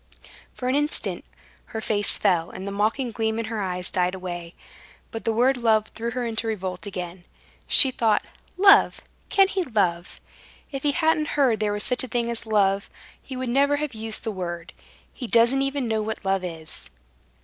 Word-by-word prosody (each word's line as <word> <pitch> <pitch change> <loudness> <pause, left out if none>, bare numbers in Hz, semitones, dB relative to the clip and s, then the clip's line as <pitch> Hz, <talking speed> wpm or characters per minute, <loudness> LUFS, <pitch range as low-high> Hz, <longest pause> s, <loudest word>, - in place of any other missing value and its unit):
For 250 - -4
an 255 - +2
instant 295 +2 -1 0.4
her 220 - -6
face 205 -2 +1
fell, 175 -5 +2
and 190 +1 -7
the - - -3
mocking 220 +5 0
gleam 220 0 -1
in 230 - -2
her 220 -1 -3
eyes 180 -1 -3
died 180 0 +1
away; 175 -2 -6 0.6
but 225 - -6
the 225 - +2
word 250 +4 +3
love 220 -3 +2
threw 230 +1 -3
her 245 +1 -3
into 225 0 -2
revolt 190 -3 -4
again. 180 -2 -6 0.4
She 265 - +6
thought: 225 -4 +1 0.3
"Love? 395 +1 +6 0.3
Can 390 -1 +5
he 385 0 -1
love? 190 - -1 0.5
If 275 -1 -4
he 290 0 +1
hadn't 320 -1 +2
heard 250 -7 +3
there 210 -1 0
was 205 0 -1
such 250 0 +1
a - - -4
thing 235 0 -1
as 230 -1 -3
love, 200 -2 +2 0.3
he 260 - -8
would 255 -1 -3
never 280 +3 +3
have 295 -2 -3
used 220 0 -4
the 225 - -2
word. 175 -2 -5 0.4
He 250 - -6
doesn't 235 +4 +4
even 275 -2 -1
know 220 -1 0
what 215 -2 -5
love 190 -1 +1
is." 160 - -7
220 Hz, 190 wpm, -24 LUFS, 190-255 Hz, 0.6 s, She